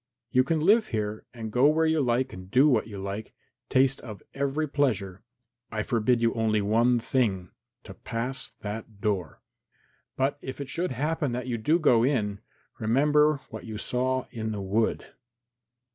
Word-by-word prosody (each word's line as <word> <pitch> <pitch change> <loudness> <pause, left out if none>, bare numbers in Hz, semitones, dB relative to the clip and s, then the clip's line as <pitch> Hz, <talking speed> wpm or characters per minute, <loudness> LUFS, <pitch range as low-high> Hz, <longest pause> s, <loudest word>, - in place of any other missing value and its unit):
You 130 - +4
can 160 +4 0
live 210 +7 +4
here 105 -1 -3
and 110 -2 -7
go 125 +5 +5
where 160 +2 +3
you 160 -1 +2
like 130 +1 0
and 95 0 -10
do 130 +8 +5
what 120 -7 +2
you 105 -3 -8
like; 100 +2 -6 0.3
taste 130 +1 +3
of 105 -6 -9
every 140 +3 -1
pleasure; 110 -11 -1 0.5
I 110 -1 -2
forbid 115 +1 +1
you 115 - +3
only 110 -2 +1
one 115 +4 +3
thing 110 -7 0 0.3
to - - -10
pass 125 +4 -4
that 105 0 -6
door. 100 -5 -2 0.7
But 135 +2 0
if 130 +1 -7
it 140 -1 -5
should 175 +2 -1
happen 145 +1 -1
that 125 0 -3
you 120 -3 -2
do 155 +9 +3
go 125 -9 +4
in, 105 -7 0 0.4
remember 145 +5 +3
what - - -7
you 110 -2 -6
saw 130 +3 -1
in 110 -1 -3
the 105 - -4
wood." 105 +4 0
120 Hz, 170 wpm, -27 LUFS, 110-140 Hz, 0.7 s, go